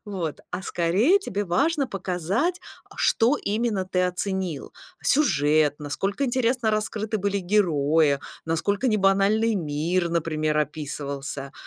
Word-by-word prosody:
вот. 180 -7 -4
А - - -3
скорее 200 - +2
тебе 205 - -3
важно 280 - +1
показать, 195 - -1 0.3
а - - -14
что 245 +5 +3
именно 210 -2 -1
ты 185 -1 0
оценил: 180 -3 -3 0.3
сюжет, 150 - +2
насколько 195 - -2
интересно 245 -2 +1
раскрыты 215 0 -2
были 200 +1 0
герои, 160 -6 +2 0.3
насколько 200 +9 0
небанальный 210 +2 +3
мир, 170 +1 -1
например, 155 -2 0
описывался. 140 -2 -4
190 Hz, 115 wpm, -25 LUFS, 155-215 Hz, 0.3 s, что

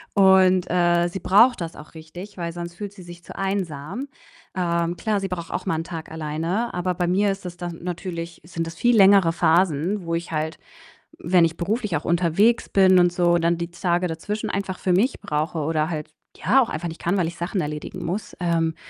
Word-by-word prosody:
Und, 190 -2 +5
äh, 175 0 +3
sie 190 - -5
braucht 210 +6 +4
das 165 0 -5
auch 150 - -13
richtig, 175 +6 -10
weil 170 -1 -3
sonst 170 0 -7
fühlt 205 +2 -6
sie 190 -3 -12
sich 175 0 -12
zu - - -11
einsam. 190 - -3 0.5
Ähm, 170 -1 0
klar, 210 +4 0
sie 195 0 -4
braucht 170 -2 -5
auch - - -3
mal - - +1
'n 160 - -2
Tag 165 -2 -8
alleine. 160 +8 -2
Aber 180 +1 -1
bei 175 0 -1
mir 195 +3 +2
ist 195 -1 -7
das 175 -1 -7
dann 175 -2 -6
natürlich 170 -1 -5
sind 165 0 -4
das 165 - -8
viel 240 +7 +3
längere 195 -3 +6
Phasen, 170 +2 +1
wo 165 0 -1
ich 170 0 -4
halt, 155 0 -2 0.6
wenn 175 -1 +4
ich 165 -1 -2
beruflich 205 +2 -2
auch 150 - -2
unterwegs 175 +7 +2
bin 190 -1 +5
und 175 0 +3
so, 175 -1 +3
dann 170 0 +1
die 170 0 -3
Tage 175 +1 0
dazwischen 190 +6 -4
einfach 195 -2 -3
für 185 - 0
mich 205 +9 +2
brauche 155 +2 -2
oder 155 +1 0
halt, 155 -2 -5 0.2
ja, 250 +10 +3
auch 235 - 0
einfach 170 +2 -4
nicht 165 - -10
kann, 185 +4 0
weil 175 -3 +1
ich 170 - -7
Sachen 180 +2 -2
erledigen 150 +4 -5
muss. 190 +6 -4
Ähm, 165 -2 0
175 Hz, 215 wpm, -23 LUFS, 165-190 Hz, 0.6 s, längere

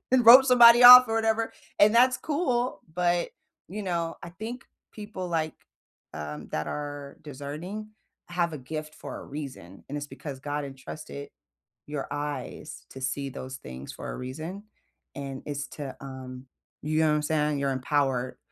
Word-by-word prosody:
you 255 -1 +5
rope 255 +3 +10
somebody 240 -2 +8
off 250 +1 +12
or 225 - -1
whatever, 225 0 +1 0.3
and 210 +2 +6
that's 255 +2 +5
cool, 255 - -1
but, 175 0 0 0.4
you 210 +4 -5
know, 170 -3 -2
I 170 - -8
think 225 +7 -7 0.3
people, 205 -4 -7
like, 160 -2 -1 0.6
um, 75 -1 -7
that 80 0 -3
are 145 - -6
discerning, 155 +9 -7 0.4
have 175 -1 -1
a 155 - -5
gift 155 +3 -6
for - - -8
a - - -9
reason, 135 - -9
and 145 - -5
it's 145 0 -4
because 135 0 -8
God 145 +1 -3
entrusted 140 +1 -9 0.6
your 145 -2 -4
eyes 145 0 -5
to 130 - -10
see 135 +1 -2
those 130 0 -7
things 65 - -9
for - - -8
a - - -6
reason, 155 +10 -6 0.5
and 135 -1 -6
it's 145 0 -3
to, 140 -3 -7
um 130 -1 -9 0.4
you 155 +1 0
know 160 - +3
what 150 - +3
I'm 150 - 0
saying? 150 -1 0
You're 140 -1 0
empowered 130 -1 0
150 Hz, 165 wpm, -27 LUFS, 135-200 Hz, 0.6 s, off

